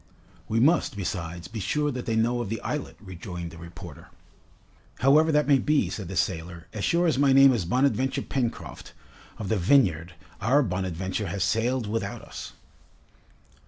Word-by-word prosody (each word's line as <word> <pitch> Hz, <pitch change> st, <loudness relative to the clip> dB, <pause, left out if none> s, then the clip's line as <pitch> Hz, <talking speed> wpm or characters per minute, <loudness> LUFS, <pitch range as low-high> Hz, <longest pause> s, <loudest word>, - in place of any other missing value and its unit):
"We 110 Hz, +1 st, +1 dB
must, 145 Hz, -2 st, +3 dB
besides, 85 Hz, -3 st, -4 dB
be 110 Hz, -, -6 dB
sure 150 Hz, +9 st, 0 dB
that 125 Hz, -2 st, -6 dB
they 115 Hz, -, 0 dB
know 120 Hz, +2 st, +1 dB
of 115 Hz, -, -4 dB
the 115 Hz, -, -3 dB
islet," 150 Hz, -1 st, -4 dB
rejoined 90 Hz, -3 st, -7 dB
the 85 Hz, -, -12 dB
reporter. 85 Hz, +1 st, -11 dB, 0.9 s
"However 150 Hz, +5 st, +5 dB
that 150 Hz, -2 st, +2 dB
may 140 Hz, -2 st, +5 dB
be," 150 Hz, +3 st, +1 dB
said 100 Hz, -5 st, -5 dB
the 95 Hz, -, -6 dB
sailor, 85 Hz, 0 st, -2 dB
"as 105 Hz, -, -4 dB
sure 170 Hz, +1 st, +2 dB
as 155 Hz, -5 st, +1 dB
my 140 Hz, -1 st, +4 dB
name 135 Hz, 0 st, +7 dB
is 105 Hz, -8 st, -1 dB
Bonadventure 130 Hz, +4 st, +1 dB
Pencroft, 125 Hz, -4 st, -4 dB, 0.4 s
of 105 Hz, -, -5 dB
the 110 Hz, -, +1 dB
Vineyard, 90 Hz, -, +2 dB, 0.3 s
our 135 Hz, +7 st, +3 dB
'Bonadventure' 95 Hz, 0 st, -3 dB
has 90 Hz, +2 st, -2 dB
sailed 115 Hz, +5 st, 0 dB
without 110 Hz, +2 st, -3 dB
us!" -, -, -9 dB
110 Hz, 165 wpm, -26 LUFS, 90-135 Hz, 0.9 s, name